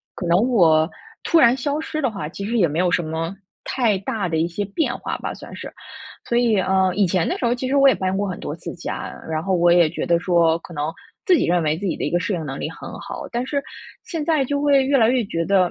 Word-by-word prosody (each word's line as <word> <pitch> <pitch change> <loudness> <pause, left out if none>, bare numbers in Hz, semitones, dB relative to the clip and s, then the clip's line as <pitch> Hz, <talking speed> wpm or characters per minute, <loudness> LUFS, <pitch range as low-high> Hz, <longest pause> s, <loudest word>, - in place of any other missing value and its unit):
可 180 - -5
能 170 +1 +4
我 160 -8 +4 0.4
突 335 - +4
然 235 -2 +6
消 285 +4 -1
失 310 - -4
的 265 - 0
话， 195 -8 -5
其 200 +3 -6
实 235 +2 -1
也 175 - +4
没 150 +2 -4
有 180 -1 +2
什 175 - +2
么 165 +4 -4 0.3
太 230 -6 +1
大 195 -2 -3
的 160 - 0
一 165 - +1
些 175 +4 -3
变 245 - -1
化 - - -4
吧， - - -5
算 - - -11
是。 - - -8 0.6
所 235 - +2
以， 230 -5 +3
呃， 190 0 +2
以 200 -3 +3
前 175 -1 +1
的 - - -1
时 - - -5
候 235 - +2
其 255 +1 -4
实 275 - 0
我 275 -1 +7
也 - - +3
搬 190 0 -1
过 200 +1 -1
很 180 - -5
多 145 - -5
次 170 - -7
家， 175 - -5 0.2
然 160 0 -2
后 190 -1 +1
我 175 0 +4
也 170 -2 +5
觉 170 - -4
得 170 -1 +2
说， 170 -2 +3
可 170 - -12
能 150 +1 -2 0.3
自 370 -4 +5
己 - - +1
认 175 0 +2
为 155 +1 +1
自 200 - -5
己 180 - 0
的 - - -4
一 - - -1
个 175 - +2
适 185 +3 -2
应 165 -4 -3
能 - - -5
力 - - -3
很 - - -9
好， - - -7
但 240 +1 -2
是 280 +1 -1 0.4
现 325 -4 -4
在 300 -4 +2
就 285 +2 -1
会 280 -2 +4
越 275 0 +3
来 225 -2 +4
越 250 -2 +2
觉 165 -4 -2
得 190 -3 +3
190 Hz, 300 characters per minute, -21 LUFS, 170-245 Hz, 0.6 s, 我